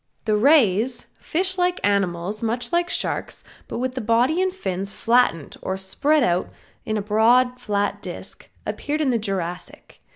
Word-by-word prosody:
The 215 -1 +2
rays, 240 -2 +3
fish 370 +2 -1
like 360 0 +1
animals 195 0 -1
much 235 +7 -2
like 345 0 +2
Sharks, - - -2 0.2
but - - -5
with 255 +1 -2
the 255 - -4
body 240 - +2
and 375 0 +1
fins 195 - -4
flattened 230 - +1
or 190 - -3
spread 280 +10 +1
out 175 -2 +1 0.4
in 215 0 -1
a 205 - -2
broad 240 +4 +3
flat 205 -1 -1
disc, - - -9 0.2
appeared 300 +2 -2
in 275 -4 +2
the 235 - +1
Jurassic. 180 -4 -5
230 Hz, 160 wpm, -23 LUFS, 200-280 Hz, 0.4 s, rays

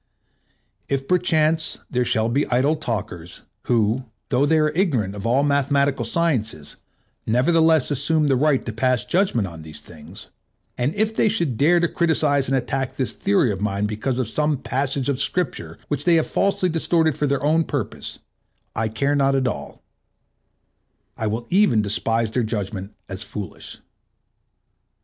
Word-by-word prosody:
If 135 -1 -2
perchance 160 -3 +1
there 125 0 0
shall 110 -1 +1
be 135 +5 0
idle 130 +5 +2
talkers, 95 - -5 0.2
who, 120 +2 +1 0.2
though 135 +2 +2
they 160 +1 +3
are 155 -1 +2
ignorant 135 - 0
of 100 +2 -5
all 130 +4 +3
mathematical 140 -1 +1
sciences, 115 - -1 0.5
nevertheless 160 +5 +3
assume 150 +2 +2
the 135 - +3
right 140 0 +2
to 115 - -4
pass 125 0 +1
judgment 175 - +1
on 85 -3 -10
these 80 -1 -11
things, 80 +5 -13 0.5
and 130 +7 -1
if 215 +1 0
they 220 - +3
should 170 - -1
dare 160 +8 +4
to 170 - +2
criticise 155 -5 +1
and 135 +1 +1
attack 130 +1 -2
this 130 - -1
theory 190 - +1
of 95 -1 -5
mine 100 -1 -1
because 110 +5 -2
of 130 -4 -1
some 150 +5 0
passage 135 0 -2
of 140 -2 0
Scripture 135 - -2
which 145 -1 -2
they 175 - +5
have 160 - +3
falsely 195 -2 +1
distorted 165 -2 +1
for 150 - 0
their 140 0 -1
own 160 +3 +3
purpose, 140 -8 -5 0.6
I 110 - 0
care 140 +7 0
not 135 -1 +2
at 130 -1 +1
all; - - -6 1.3
I 110 - -2
will 115 +3 -3
even 180 - +4
despise 115 +2 -1
their 125 - 0
judgment 105 -3 -4
as 95 +1 -7
foolish. 105 -3 -7
135 Hz, 160 wpm, -22 LUFS, 110-155 Hz, 1.3 s, they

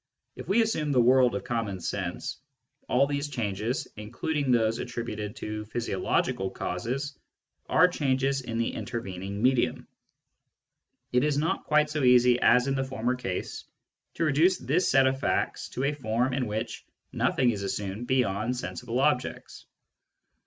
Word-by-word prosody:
If - - -9
we 225 +4 +4
assume 155 -10 -1
the 130 - +3
world 125 +1 +5
of - - -3
common 115 -6 -2
sense, 90 0 -4 0.5
all 135 +3 +4
these 140 +1 -2
changes, 115 -2 -2
including 130 +7 -2
those 115 -2 +2
attributed 115 -3 -5
to 105 -4 -5
physio 110 -3 -3
logical 95 +1 0
causes, 130 +14 -3 0.5
are 170 +3 +6
changes 135 -4 0
in 115 -3 -5
the 115 - -1
intervening 100 -2 -5
medium. 130 -1 +2 1.2
It 125 +1 +3
is 150 -1 +1
not 155 +3 -1
quite 150 0 +3
so 150 - -1
easy 125 -1 +5
as 125 +1 +5
in 135 - 0
the 135 -1 0
former 125 -2 -1
case 110 -8 -4 0.5
to - - -1
reduce 160 +5 +3
this 150 +8 +1
set 135 0 +5
of 130 0 +1
facts - - -1
to 130 - -4
a 140 +2 +1
form 125 -1 -1
in 125 -2 -1
which 110 +1 -4 0.3
nothing 125 -2 +2
is 105 -3 -4
assumed 100 +3 -4
beyond 125 -1 0
sensible 125 0 -4
objects. 135 -2 -1
125 Hz, 150 wpm, -27 LUFS, 110-140 Hz, 1.2 s, are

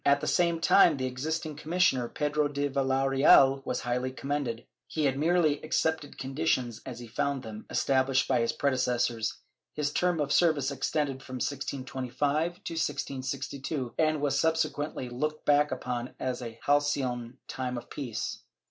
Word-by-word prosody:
At 140 0 +4
the - - -4
same 170 -2 +2
time 165 -2 +5
the 130 - -2
existing 155 +5 -3
commissioner, 150 -7 +1
Pedro 150 0 0
de 145 0 -1
Villareal, 135 0 +4
was - - -1
highly 125 +1 -1
commended. 130 -4 -3 0.2
He 155 -2 -1
had 135 -1 +2
merely 155 0 +2
accepted 155 -1 -1
conditions 130 -4 -1
as 125 -3 -6
he 120 - -8
found 135 +3 -2
them 110 -1 -9
established 130 -1 +2
by 130 -2 +2
his 115 - +1
predecessors; 125 -4 0 0.4
his 150 -1 -1
term 180 -2 +1
of 145 -1 0
service 150 -6 +3
extended 140 0 -1
from 130 -1 -8
1625 140 +5 -2
to - - -5
1662 135 -2 -3
and 155 -1 +3
was 145 -2 +1
subsequently 155 -4 0
looked 150 +6 -3
back 145 0 +4
upon 125 -1 -4
as 130 -1 -2
a 115 -2 -7
halcyon 135 -4 0
time 125 -1 -3
of 120 - -9
peace. 125 -7 -4
135 Hz, 150 wpm, -29 LUFS, 130-150 Hz, 0.4 s, time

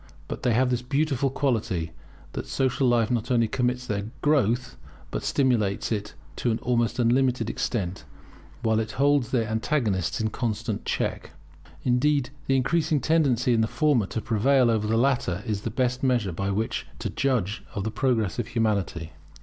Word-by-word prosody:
But - - -5
they 125 - +2
have 125 +1 +3
this 125 -1 0
beautiful 140 +1 0
quality, 110 - -1 0.4
that - - -5
social 130 0 +1
life 120 -1 +2
not 120 0 -1
only 115 -3 +3
permits 125 +2 -1
their 100 -2 -2 0.2
growth, 125 -4 +2 0.4
but - - -2
stimulates 115 -9 +1
it 105 -4 -3 0.2
to 120 - 0
an 110 - +1
almost 120 -2 +1
unlimited 125 -1 +2
extent, 95 - -2 0.6
while 110 -1 +2
it 110 0 -3
holds 140 -3 +2
their 115 -4 +1
antagonists 110 - 0
in 110 -1 -1
constant 115 -4 -3
check. - - -2 0.5
Indeed 135 +2 +2 0.2
the 135 - +3
increasing 155 +3 +2
tendency 135 -6 +2
in 115 - +3
the 110 - +2
former 140 -7 +2
to 115 - -3
prevail 125 +3 +3
over 110 -2 0
the 110 +1 +2
latter 120 -7 +1
is 105 -4 -2
the 115 - -3
best 125 +2 0
measure 120 -7 +1
by 100 +4 -2
which 110 +3 -2
to - - -4
judge 110 -7 0
of 100 - -2
the 110 - -2
progress 110 -7 0
of 115 - -2
Humanity. 100 -8 -1
120 Hz, 170 wpm, -26 LUFS, 110-130 Hz, 0.6 s, have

